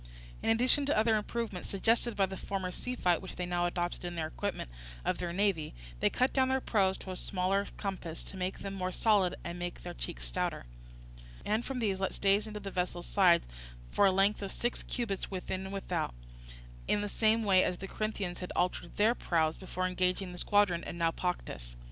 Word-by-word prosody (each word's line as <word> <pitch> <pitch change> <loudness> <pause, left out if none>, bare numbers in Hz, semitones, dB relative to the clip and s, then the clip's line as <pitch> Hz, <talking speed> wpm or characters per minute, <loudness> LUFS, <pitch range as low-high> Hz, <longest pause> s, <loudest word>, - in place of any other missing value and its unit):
In - - 0
addition 250 +5 +4
to 285 - +2
other 220 +1 +4
improvements 215 -3 -3
suggested 225 +4 +2
by 195 - +4
the 190 0 -6
former 190 -1 -3
sea 250 +7 -4
fight 180 -7 +2
which 190 - -8
they 180 - -2
now 175 0 +1
adopted 175 0 -2
in 175 0 -4
the 160 -2 -1
equipment 170 - -3 0.3
of - - 0
their 175 -1 -2
navy, 185 - +1 0.2
they - - +4
cut 255 +1 +1
down 260 -1 +3
their 265 0 +3
prows 195 -6 +2
to 190 - -7
a - - -4
smaller 195 +2 0
compass 185 -5 -4
to - - -9
make 185 0 -2
them 195 -1 -5
more 185 -1 -2
solid 200 -2 +3
and 170 +1 -5
made 175 0 -3
their - - -7
cheeks - - -5
stouter, - - -2 0.8
and 220 +3 +1
from 270 - -3
these 205 -5 0
let 195 - -1
stays 200 +2 +3
into 210 -1 -5
the 200 -1 -6
vessels' 180 -1 -2
sides 180 -4 +5 0.5
for 200 - +5
a - - +5
length 195 +3 +3
of 195 -1 -3
six 240 0 -1
cubits 225 -6 -3
within 190 0 -3
and 190 - -6
without, 195 - -2 0.7
in 205 - +2
the 205 - -1
same 220 +2 +3
way 190 -3 +5
as 180 - 0
the 195 - -6
Corinthians 205 -4 -3
had 180 - -5
altered 180 -1 0
their 215 +3 +5
prows 160 -8 +1
before 185 -1 -3
engaging 185 0 0
the 180 - -7
squadron 205 -5 +3
at - - -5
Naupactus. 165 - -2
190 Hz, 205 wpm, -32 LUFS, 180-210 Hz, 0.8 s, sides